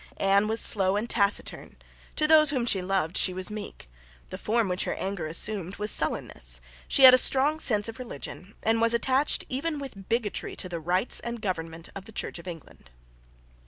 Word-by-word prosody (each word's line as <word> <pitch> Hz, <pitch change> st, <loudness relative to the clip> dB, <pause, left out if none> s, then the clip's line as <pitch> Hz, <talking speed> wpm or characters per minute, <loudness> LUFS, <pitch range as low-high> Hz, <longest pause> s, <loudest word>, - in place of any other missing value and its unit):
Anne 195 Hz, +1 st, +2 dB
was 220 Hz, +1 st, +1 dB
slow 195 Hz, -2 st, +5 dB
and 225 Hz, +3 st, -3 dB
taciturn. 200 Hz, -2 st, -1 dB, 0.4 s
To 305 Hz, -, +1 dB
those 305 Hz, -1 st, +6 dB
whom 260 Hz, -5 st, -1 dB
she 195 Hz, -5 st, +1 dB
loved 180 Hz, -3 st, -1 dB
she 185 Hz, -, +2 dB
was 185 Hz, +2 st, -2 dB
meek. 210 Hz, -, -9 dB, 0.4 s
The 185 Hz, -, -5 dB
form 225 Hz, +2 st, 0 dB
which 180 Hz, 0 st, -2 dB
her -, -, -3 dB
anger 190 Hz, -5 st, -4 dB
assumed 190 Hz, +3 st, 0 dB
was 210 Hz, 0 st, 0 dB
sullenness. -, -, 0 dB, 0.3 s
She 275 Hz, -, +3 dB
had 255 Hz, -1 st, +11 dB
a 255 Hz, -, +7 dB
strong 285 Hz, +5 st, +3 dB
sense 210 Hz, -8 st, 0 dB
of 225 Hz, +3 st, -9 dB
religion, 200 Hz, -, -9 dB
and 225 Hz, 0 st, +1 dB
was 230 Hz, 0 st, +2 dB
attached 265 Hz, +4 st, +1 dB
even 300 Hz, +4 st, -3 dB
with 250 Hz, -9 st, -10 dB
bigotry 230 Hz, -3 st, -2 dB
to 185 Hz, -, -5 dB
the 170 Hz, -2 st, -5 dB
rites 180 Hz, +7 st, 0 dB
and 235 Hz, 0 st, -6 dB
government 165 Hz, -5 st, -5 dB
of 195 Hz, -1 st, -8 dB
the 220 Hz, -, -12 dB
Church -, -, -5 dB
of 170 Hz, -, -13 dB
England. 165 Hz, -, -11 dB
205 Hz, 195 wpm, -26 LUFS, 185-240 Hz, 0.4 s, had